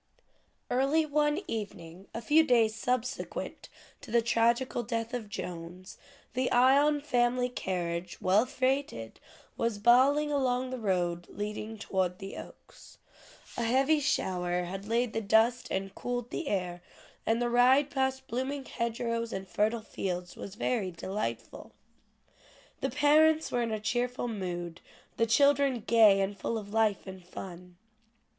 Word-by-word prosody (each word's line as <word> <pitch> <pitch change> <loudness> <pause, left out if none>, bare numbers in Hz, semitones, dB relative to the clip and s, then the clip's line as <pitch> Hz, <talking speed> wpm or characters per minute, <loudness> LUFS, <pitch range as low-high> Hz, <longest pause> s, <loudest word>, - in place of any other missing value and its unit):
Early 275 +5 +2
one 295 +3 +1
evening, 195 - -6
a 230 - -6
few 310 +7 +5
days 235 -6 +3
subsequent 250 +2 -3 0.3
to 285 - -12
the 235 +1 +3
tragical 235 +2 +2
death 230 +1 -3
of 230 -4 -4
Jones, 180 -1 -7 0.3
the 255 0 0
Ion 280 +4 +4
family 250 -3 +1
carriage, 175 -6 -3
well 205 +6 +3
freighted, 255 - -2 0.4
was 230 -2 0
bowling 265 +7 +4
along 255 -2 0
the 255 - -4
road 175 -4 -1
leading 210 +1 -5
toward 185 -3 -1
the 195 0 -8
Oaks. - - -13 0.6
A - - -3
heavy 265 +6 +3
shower 180 -10 0
had 195 +3 -6
laid 235 +1 0
the 225 - -1
dust 225 +4 +3
and 195 0 -3
cooled 245 -1 -4
the 335 - -4
air, 180 -4 -2 0.5
and 225 +1 +2
the 240 - +1
ride 255 +4 +4
past 265 -1 -1
blooming 265 +3 -3
hedgerows, 230 -1 -2
and 190 0 -5
fertile 215 +4 0
fields 180 -4 -4
was 200 - -8
very 220 -4 -1
delightful. 190 +4 -5 1.1
The - - -1
parents 310 +2 +4
were 245 - +1
in 225 -2 -1
cheerful 245 +1 -1
mood, 175 -5 -5 0.4
the 230 - +2
children 280 -1 +3
gay 220 -4 +6
and 195 +1 -1
full 225 +3 -3
of 205 -1 -8
life 220 -2 +2
and 190 -1 -9
fun. 180 0 -10
230 Hz, 140 wpm, -30 LUFS, 195-255 Hz, 1.1 s, gay